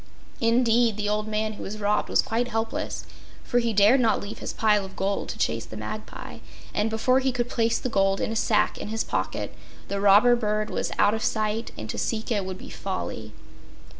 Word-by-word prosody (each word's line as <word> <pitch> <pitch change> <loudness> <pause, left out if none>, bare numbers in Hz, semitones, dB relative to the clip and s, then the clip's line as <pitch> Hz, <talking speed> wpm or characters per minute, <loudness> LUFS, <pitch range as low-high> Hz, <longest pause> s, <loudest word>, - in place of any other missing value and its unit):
Indeed, 230 -1 +3
the 210 -1 -1
old 210 +1 0
man 215 0 -1
who - - -10
was 210 +2 -5
robbed 210 0 +1
was - - +3
quite 235 +2 -1
helpless, 225 -1 -3 0.4
for 245 - +1
he 235 -1 0
dared 210 +5 +5
not 230 -3 +3
leave 205 +2 -7
his - - -4
pile 210 -2 +2
of 190 0 -9
gold 195 +1 -1
to - - -5
chase 115 0 -1
the 110 - -8
magpie, 160 - -7 0.3
and 210 +1 +1
before 255 +4 +2
he 265 0 +1
could 245 -1 -1
place 230 0 +1
the - - -3
gold 195 -4 +2
in - - -1
a - - -2
sack 215 -1 +2
in - - -5
his 220 +1 -1
pocket - - -3 0.4
the 200 0 -2
robber 205 +5 +6
bird 215 -2 -1
was - - -2
out 205 - +4
of 220 - -2
sight 215 +1 0
and 110 - -6
to - - -5
seek 225 +1 -2
it 205 -4 +1
would 190 0 -5
be - - -10
folly. 185 - -5
215 Hz, 215 wpm, -26 LUFS, 200-230 Hz, 0.4 s, robber